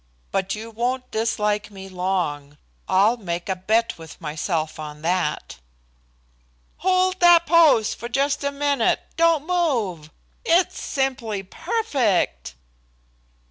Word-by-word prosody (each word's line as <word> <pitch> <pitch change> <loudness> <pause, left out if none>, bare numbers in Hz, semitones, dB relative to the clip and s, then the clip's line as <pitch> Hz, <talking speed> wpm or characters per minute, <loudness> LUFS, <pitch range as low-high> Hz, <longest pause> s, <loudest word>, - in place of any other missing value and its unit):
But 195 +1 -1
you 225 +2 -8
won't 250 +3 -2
dislike 210 -2 -1
me 195 -2 -10
long. 180 -6 -3 0.3
I'll 210 +6 +4
make 175 -5 -4
a 190 - -1
bet 220 +3 0
with 160 -2 -11
myself 155 0 -3
on 150 0 -8
that." 170 - -1 1.2
"Hold 370 0 +1
that 345 -1 +6
pose 310 -9 +4
just 275 +3 0
a 280 - 0
minute. 285 0 +1 0.2
Don't 330 -3 +3
move. 240 - -1 0.3
It's 360 -5 +2
simply 245 -7 -2
perfect." 245 - -1
220 Hz, 110 wpm, -23 LUFS, 180-285 Hz, 1.2 s, that